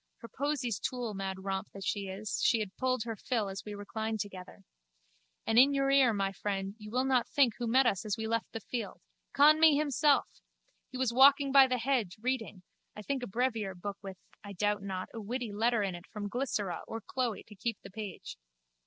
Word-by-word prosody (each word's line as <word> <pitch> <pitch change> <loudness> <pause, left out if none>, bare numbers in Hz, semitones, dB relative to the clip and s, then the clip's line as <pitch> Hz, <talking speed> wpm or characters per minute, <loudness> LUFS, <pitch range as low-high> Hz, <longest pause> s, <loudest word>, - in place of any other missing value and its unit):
Her 230 - -8
posies 255 -4 -2
too! 245 -4 -3
Mad 190 -1 -5
romp 195 -1 -2
that 195 - -7
she 200 -2 -2
is, 195 +3 -4
she 230 - +4
had 205 -3 -4
pulled 255 -3 0
her 230 -1 -4
fill 215 -1 -2
as 195 0 -6
we 210 -1 -7
reclined 220 +2 -4
together. 195 -1 -7 0.8
And 225 +1 +4
in 280 +2 +6
your 275 0 +2
ear, 270 -3 +5
my 195 -2 -1
friend, 195 0 -3
you 210 0 -9
will 250 +4 0
not 255 -2 +2
think 275 -6 +3
who 240 - -2
met 260 +4 +4
us 195 -6 +1
as 215 -2 -2
we 220 - -3
left 230 +1 -2
the 225 - -5
field. 235 +2 -5 0.3
Conmee 305 +1 +6
himself! 295 -1 +3 0.6
He 255 - -7
was 255 -2 0
walking 275 +2 +6
by 270 -1 +8
the 255 -1 0
hedge, 235 -7 -1
reading, 225 -6 -3 0.3
I 210 - -8
think 275 +3 -2
a 245 - -4
brevier 225 -3 -1
book 200 +3 -6
with, 195 -2 -8 0.3
I 205 -1 -8
doubt 205 +1 0
not, 190 -2 -5
a 225 - -6
witty 235 +1 -4
letter 225 +1 +1
in 195 -2 -2
it 175 +1 -10
from 205 -1 -6
Glycera 210 -7 -2
or 225 0 -5
Chloe 245 -4 -3
to 215 - -15
keep 230 +2 -3
the 195 - -10
page. 205 -2 -7
225 Hz, 210 wpm, -31 LUFS, 200-255 Hz, 0.8 s, by